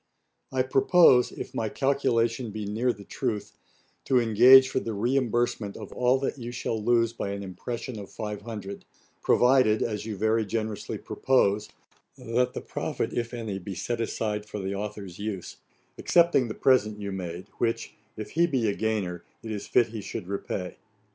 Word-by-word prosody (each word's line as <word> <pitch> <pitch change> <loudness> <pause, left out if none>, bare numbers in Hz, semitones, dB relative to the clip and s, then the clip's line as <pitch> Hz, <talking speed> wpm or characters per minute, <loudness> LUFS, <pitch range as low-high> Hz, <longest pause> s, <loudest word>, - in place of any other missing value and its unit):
I 130 -1 +1
propose, 130 0 +5
if - - -7
my 110 - -1
calculation 120 -3 +1
be 105 0 -5
near 115 +5 0
the 100 -3 -10
truth, 105 -3 -4 0.5
to 130 - +4
engage 125 +4 +7
for 130 - -1
the 115 -4 -4
reimbursement 120 -2 0
of - - -9
all 125 +1 +3
that 140 - -2
you 120 0 -5
shall 115 -3 -3
lose 115 0 +3
by 110 - -4
an 100 0 -5
impression 115 +5 -6
of 100 - -9
500; 105 -2 -6 0.4
provided, 125 -4 +4
as 105 -3 -3
you 105 -3 -4
very 110 +2 +2
generously 110 0 -3
propose, 105 -5 +1 0.5
that 125 +2 0
the - - -3
profit, - - -3
if 115 -1 -2
any, 110 -5 -4
be 95 +1 -7
set 115 +7 -2
aside 105 -2 -2
for 105 - -6
the 95 -1 -3
authour's 100 -3 -6
use, 100 -3 -5 0.4
excepting 170 -7 +4
the 110 - -5
present 110 -5 +3
you 100 -1 -4
made, 90 -2 -5
which, 115 -1 -1 0.2
if 110 - -6
he 170 +2 +3
be 130 -8 0
a 100 - +1
gainer, 100 -6 -2 0.2
it 110 - -5
is 105 -2 -5
fit 120 -2 +3
he 110 -1 -6
should 100 -1 -6
repay. 95 -2 -4
110 Hz, 170 wpm, -27 LUFS, 105-125 Hz, 0.5 s, engage